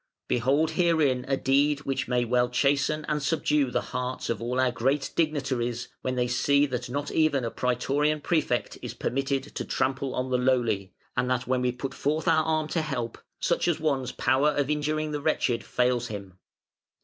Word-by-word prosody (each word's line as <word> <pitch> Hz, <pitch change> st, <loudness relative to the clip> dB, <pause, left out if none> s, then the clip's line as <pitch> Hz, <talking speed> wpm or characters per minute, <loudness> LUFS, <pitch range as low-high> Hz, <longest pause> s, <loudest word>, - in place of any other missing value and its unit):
Behold 135 Hz, +6 st, +2 dB
herein 155 Hz, -8 st, +2 dB
a 135 Hz, -1 st, +1 dB
deed 140 Hz, +2 st, +2 dB
which 135 Hz, -2 st, -2 dB
may 125 Hz, -1 st, +1 dB
well 125 Hz, +1 st, +2 dB
chasten 140 Hz, +4 st, +1 dB
and 150 Hz, -1 st, 0 dB
subdue 150 Hz, -2 st, +1 dB
the -, -, -1 dB
hearts 125 Hz, -1 st, -2 dB
of 115 Hz, -2 st, -3 dB
all 125 Hz, +2 st, -1 dB
our 130 Hz, -1 st, +3 dB
great 135 Hz, +4 st, 0 dB
dignitaries 130 Hz, -7 st, -1 dB
when 130 Hz, 0 st, -2 dB
they 125 Hz, -1 st, +1 dB
see 140 Hz, +3 st, +3 dB
that 125 Hz, -3 st, -4 dB
not 145 Hz, +3 st, -3 dB
even 150 Hz, -5 st, +2 dB
a 115 Hz, -, -2 dB
Prætorian 145 Hz, +4 st, 0 dB
Prefect 155 Hz, -7 st, 0 dB
is -, -, -6 dB
permitted 135 Hz, +1 st, -1 dB
to -, -, -3 dB
trample 130 Hz, 0 st, -1 dB
on 130 Hz, 0 st, -2 dB
the 125 Hz, -, +2 dB
lowly, 120 Hz, -7 st, +1 dB, 0.2 s
and 125 Hz, 0 st, 0 dB
that 125 Hz, 0 st, 0 dB
when 125 Hz, 0 st, 0 dB
we 125 Hz, 0 st, +1 dB
put 135 Hz, +2 st, -5 dB
forth 155 Hz, +5 st, -1 dB
our 160 Hz, -1 st, +4 dB
arm 155 Hz, -1 st, 0 dB
to 165 Hz, -, 0 dB
help, 120 Hz, -6 st, -4 dB, 0.2 s
such -, -, +1 dB
an 175 Hz, -, +2 dB
one's 140 Hz, -5 st, 0 dB
power 130 Hz, +4 st, +2 dB
of 145 Hz, -1 st, 0 dB
injuring 155 Hz, +1 st, -1 dB
the 150 Hz, -1 st, -3 dB
wretched 125 Hz, -6 st, +1 dB
fails 125 Hz, -1 st, +1 dB
him. 100 Hz, -4 st, -8 dB
135 Hz, 185 wpm, -27 LUFS, 125-150 Hz, 0.2 s, our